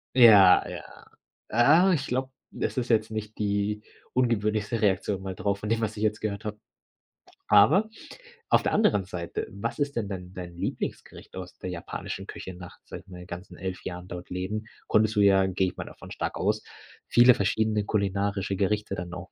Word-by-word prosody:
Ja, 105 -7 +8
ja. - - -9 0.9
Äh, - - +4
ich 140 -4 -2
glaube, 130 +1 -2 0.2
das - - -3
ist 125 -1 -1
jetzt 110 -1 +2
nicht 110 0 -6
die 105 0 -1 0.3
ungewöhnlichste 110 -2 0
Reaktion 100 -1 +1
mal 95 -1 -5
drauf 100 +2 -1
von 105 - -4
dem, 115 +1 +1
was 110 -1 -2
ich 105 - -5
jetzt 105 -1 +1
gehört 110 0 -3
habe. 105 0 -5 0.9
Aber 110 - +5 0.6
auf - - +5
der - - -1
anderen 105 - +3
Seite: 90 -2 -5
was 100 +7 -5
ist 145 -1 -1
denn 110 -3 -1
dein 90 -2 -7
dein 90 -2 -8
Lieblingsgericht 85 - -5
aus 90 -1 -8
der 90 - -5
japanischen 85 -2 -6
Küche 95 - -7
nach, 90 0 -11
sage - - -9
ich 95 - -18
mal 90 0 -9
ganzen 90 0 -9
11 95 -2 -5
Jahren 90 0 -6
dort 90 -1 -8
leben? 95 +4 -3 0.2
Konntest 110 0 +3
du, 105 - +3
ja, 95 -1 +5
gehe 95 0 +1
ich 90 - -6
mal - - -5
davon - - -12
stark - - -3
aus, 105 +3 0 0.5
viele 120 +1 +7
verschiedene 105 +1 +1
kulinarische 100 -1 -1
Gerichte 105 +1 0
dann 90 -1 -6
auch 90 0 -8
100 Hz, 185 wpm, -27 LUFS, 95-110 Hz, 0.9 s, Ja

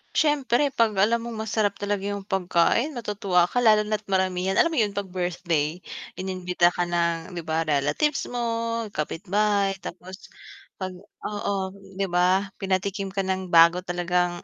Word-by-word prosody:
syempre 285 -2 +2
'pag 230 -5 +2
alam 215 +5 +3
mong 230 -2 -6
masarap 205 -2 +1
talaga 205 -1 -2
yung 200 -1 -3
pagkain 195 - +1
matutuwa 200 -6 +1
ka 245 - -1
lalo 215 -2 +6
na't 215 0 -2
maramihan. 190 0 0
Alam 335 - +4
mo - - -2
yun 205 -2 -1
'pag 200 -1 -3
birthday 175 -3 -1 0.4
inimbita 180 -2 +1
ka 175 - 0
ng, 170 0 -1
'di 170 - -4
ba, 160 +1 0
relatives 150 - +1
mo, 230 -1 -1
kapitbahay 200 +5 0
tapos 185 +2 -9 0.5
pag 185 -1 -3 0.3
oo, 205 -1 -2 0.4
di - - +2
ba? 185 +2 +2
Pinatikim 195 0 -1
ka 195 0 -1
ng 190 0 -2
bago 170 +1 +7
talagang 175 0 -1
190 Hz, 150 wpm, -25 LUFS, 175-210 Hz, 0.5 s, bago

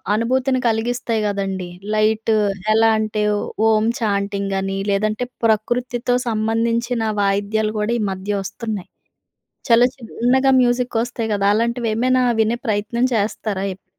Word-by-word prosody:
అనుభూతిని 255 +3 +1
కలిగిస్తాయి 230 0 -1
కదండీ! 195 -3 -3 0.3
లైట్ 220 +1 +2 0.4
ఎలా 225 0 +5
అంటే 215 -1 -1
ఓ 205 - 0 0.3
ఓం 215 0 +3 0.2
ఛాంటింగ్ 200 -2 -1
అని 195 0 -3
లేదంటే 215 +4 0 0.2
ప్రకృతితో 240 +3 0
సంబంధించిన 230 +2 0 0.2
వాయిద్యాలు 205 +2 0
కూడా 210 +2 0
ఈ - - -1
మధ్య 190 +2 -4
వస్తున్నాయి. 210 -1 -5 0.8
చాలా 235 +2 +6
చిన్నగా 255 +2 +1
మ్యూజిక్ 245 -1 +1
వస్తాయి 235 -2 -4
కదా! 200 0 0
అలాంటివి 235 +1 0
ఏమైనా 255 +2 +2 0.2
వినే 230 +2 0
ప్రయత్నం 215 +3 0
చేస్తారా 205 -1 -2
ఎప్పుడూ? 185 - -24
220 Hz, 125 wpm, -20 LUFS, 205-240 Hz, 0.8 s, చాలా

